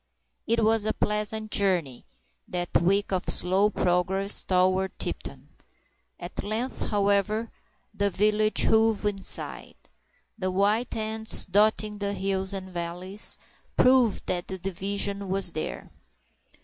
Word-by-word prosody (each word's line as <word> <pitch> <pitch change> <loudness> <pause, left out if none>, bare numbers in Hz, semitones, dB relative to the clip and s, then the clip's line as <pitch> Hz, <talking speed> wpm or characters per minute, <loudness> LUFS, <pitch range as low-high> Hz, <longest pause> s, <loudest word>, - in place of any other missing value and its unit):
It 230 0 +2
was 220 0 +2
a 215 - +1
pleasant 215 +1 -2
journey—that 170 - -2
week 195 +4 +1
of 185 - -1
slow 190 +3 +3
progress 190 +1 +3
toward 185 +1 +1
Tipton. - - -4 0.7
At - - -7
length, 220 +5 -3
however, 205 +2 0 0.4
the 200 -1 0
village 215 +2 +1
hove 220 -1 +2
in 200 -2 -1
sight. - - -1 0.6
The 185 - -1
white 205 +6 +1
tents 220 0 0
dotting 210 +2 +2
the 200 0 -2
hills 190 -1 -2
and 190 -1 -6
valleys 180 +3 -2 0.4
proved 250 -4 +3
that 175 -1 -3
the 190 - -5
division 200 +2 -3
was 190 -2 +2
there. 155 - -6
200 Hz, 120 wpm, -26 LUFS, 185-215 Hz, 0.7 s, slow